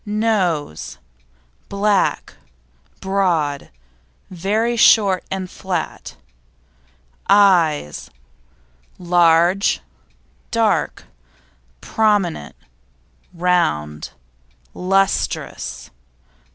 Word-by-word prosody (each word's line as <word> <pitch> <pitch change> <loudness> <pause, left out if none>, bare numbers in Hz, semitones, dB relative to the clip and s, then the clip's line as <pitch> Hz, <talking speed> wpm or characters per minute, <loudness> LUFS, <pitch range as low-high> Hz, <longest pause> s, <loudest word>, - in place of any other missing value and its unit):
NOSE 205 - -1 0.7
Black, 200 0 0 0.7
broad, 175 -7 -1 0.6
very 210 +7 -1
short 200 -5 +4
and 190 -1 -4
flat. 185 0 -5 1.1
EYES 175 - +3 0.9
Large, 175 +2 +3 0.7
dark, - - 0 0.8
prominent, 205 - 0 0.8
round, 75 - -1 0.6
lustrous. 185 - -1
185 Hz, 45 wpm, -19 LUFS, 165-200 Hz, 1.1 s, short